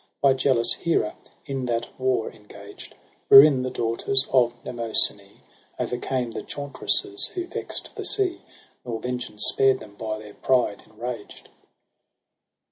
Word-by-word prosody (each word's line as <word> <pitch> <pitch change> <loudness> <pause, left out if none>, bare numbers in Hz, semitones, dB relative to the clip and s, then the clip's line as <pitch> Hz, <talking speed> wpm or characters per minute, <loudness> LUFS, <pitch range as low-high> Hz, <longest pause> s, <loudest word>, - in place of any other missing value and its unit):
By 140 -1 +4
jealous 130 -3 +3
Hera 165 -11 -1 0.3
in 135 -3 -4
that 115 -1 -1
war 130 -3 0
engaged: 105 -1 -14 0.3
Wherein 135 -1 +8
the 130 - -2
daughters 120 +3 +1
of 120 -2 +3
Mnemosyn^ 115 -3 +1 0.6
O'ercame 125 -1 -3
the - - -5
chauntresses 370 - 0
who 360 -1 -3
vex'd - - -5
the - - -6
sea. 385 -4 -1 0.4
Nor 115 -2 -5
vengeance 125 -3 -4
spared 135 -1 +3
them 100 - -13
by 110 +1 -5
their 105 -1 -12
pride 125 -5 0
enraged. 120 -3 -8
125 Hz, 125 wpm, -24 LUFS, 115-135 Hz, 0.6 s, Wherein